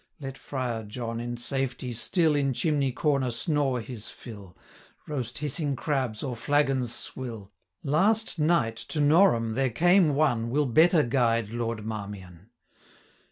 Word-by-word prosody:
Let 135 -2 -6
Friar 125 -5 -4
John, 115 +2 -5
in 120 0 -4
safety, 125 0 -3
still 160 - +2
In 140 -2 +1
chimney 145 -1 +1
corner 140 -1 +1
snore 140 0 0
his 110 -1 -8
fill, 100 -6 -11 0.5
Roast 130 -5 -4
hissing 145 0 -1
crabs, 130 -5 -2
or 130 -4 -3
flagons 135 -1 +1
swill: 115 -5 -6 0.3
Last 195 +7 +1
night, 150 -8 +2
to 150 - -5
Norham 145 - +4
there 135 +2 +1
came 175 - +4
one, 120 -6 +1
385 - - -5
Will 150 +1 +2
better 160 +5 +4
guide 115 -3 +1
Lord 115 -2 -3
Marmion.' 100 -3 -7
130 Hz, 140 wpm, -27 LUFS, 115-150 Hz, 0.5 s, Norham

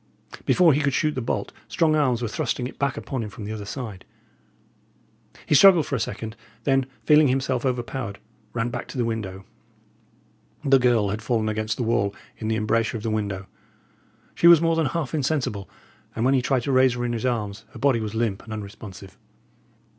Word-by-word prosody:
Before 175 -4 +5
he 145 - +1
could 140 -2 +1
shoot 155 -2 +1
the 130 - -3
bolt, 115 - -3
strong 155 -2 +2
arms 130 -6 +1
were - - 0
thrusting 120 0 -2
it 125 - -8
back 140 -1 0
upon 130 -3 -4
him 110 - -5
from 105 - -9
the 105 - -5
other 105 -2 -5
side. 105 -4 -6 1.4
He - - 0
struggled 175 +1 +7
for - - -2
a - - -1
second; 110 0 -4 0.3
then, 135 0 +2 0.2
feeling 150 -1 +6
himself 130 -1 0
overpowered, 120 -4 -3 0.3
ran 115 0 -1
back 120 +1 -5
to - - -8
the 120 - +1
window. 100 -4 -4 1.2
The 135 -1 +5
girl 120 -5 +3
had 105 +2 -3
fallen 110 -1 0
against 110 0 -2
the 125 - -1
wall 100 -3 0 0.2
in 110 - -4
the 110 - +1
embrasure 115 +1 0
of 105 - -9
the 115 - -1
window; 100 -3 -2 0.9
she 170 - +4
was 170 -2 +9
more 165 0 +2
than 160 -3 +1
half 155 -4 -3
insensible; 135 -9 -1 0.5
and 115 - 0
when 135 - +4
he 130 - +3
tried 130 -1 0
to 140 - -1
raise 130 -1 +4
her 120 0 -2
in 120 - -1
his 115 - -3
arms, 105 -5 -2
her - - -9
body 135 -4 +2
was 110 0 -4
limp 110 -4 -1
and 110 - -11
unresponsive. 100 -2 -9
120 Hz, 200 wpm, -24 LUFS, 110-135 Hz, 1.4 s, was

